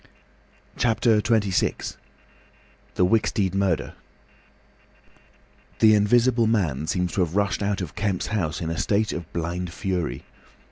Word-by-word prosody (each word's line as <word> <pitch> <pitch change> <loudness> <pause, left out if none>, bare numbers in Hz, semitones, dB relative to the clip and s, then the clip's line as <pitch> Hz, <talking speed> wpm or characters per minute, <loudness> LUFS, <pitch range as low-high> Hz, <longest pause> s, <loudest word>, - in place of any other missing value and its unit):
CHAPTER 115 -2 +2
XXVI. 105 -4 0 1.0
THE 90 - +3
WICKSTEED 100 -2 +1
MURDER 95 -4 0 1.8
The 110 -1 +6
Invisible 115 +3 +3
Man 80 - 0
seems 90 0 -1
to 95 - 0
have 85 0 -1
rushed 100 0 0
out 100 -1 -1
of 90 - -5
Kemp's 100 -4 -1
house 90 -6 -1
in 80 -1 -3
a 80 - -3
state 110 +1 +1
of 85 -1 -7
blind 85 +1 -3
fury. 90 -2 -3
95 Hz, 125 wpm, -24 LUFS, 90-110 Hz, 1.8 s, The